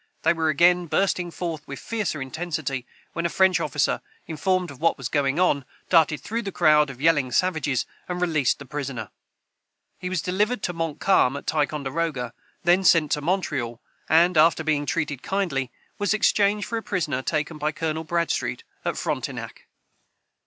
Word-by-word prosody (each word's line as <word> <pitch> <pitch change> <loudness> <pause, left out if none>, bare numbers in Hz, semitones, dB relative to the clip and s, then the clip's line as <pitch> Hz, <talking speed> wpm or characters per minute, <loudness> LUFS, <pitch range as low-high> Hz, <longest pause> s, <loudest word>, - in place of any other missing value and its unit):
They - - +4
were 160 -1 0
again 175 +3 +4
bursting 180 0 +1
forth 165 -3 -5
with 140 - -6
fiercer 210 -11 -3
intensity, 140 -3 -4 0.3
when 170 - -2
a 170 - +1
French 185 +1 +3
officer, 145 -1 0 0.2
informed 180 +2 -1
of 140 - -13
what 165 - +2
was 135 -4 -4
going 140 +1 +1
on, 145 -6 +3 0.3
darted 160 -3 +4
through 230 +2 -3
the 200 -3 -5
crowd 150 -4 +4
of 130 -3 -9
yelling 145 -4 +3
savages, 155 -4 +1 0.2
and 180 0 -2
released 160 -7 +1
the 140 - -10
prisoner. 135 -6 -5 0.9
He 180 - -4
was 185 -3 -1
delivered 205 +4 0
to 180 - -1
Montcalm 165 -3 +2
at - - -9
Ticonderoga, 145 -3 -1 0.3
then 175 +2 +4
sent 165 -4 +4
to 150 - +1
Montreal, 145 -9 -1 0.3
and, 170 +2 +4
after 160 0 +4
being 150 -2 0
treated 150 -6 -1
kindly, 155 -11 -1 0.3
was 205 +1 +2
exchanged 205 -1 +2
for 230 - -2
a - - -9
prisoner 170 - -1
taken 150 +2 -2
by 150 +1 0
Colonel 160 +1 -3
Bradstreet 170 +1 -1 0.2
at - - -2
Frontenac.] - - -3
Son. - - -27
160 Hz, 165 wpm, -24 LUFS, 145-180 Hz, 0.9 s, They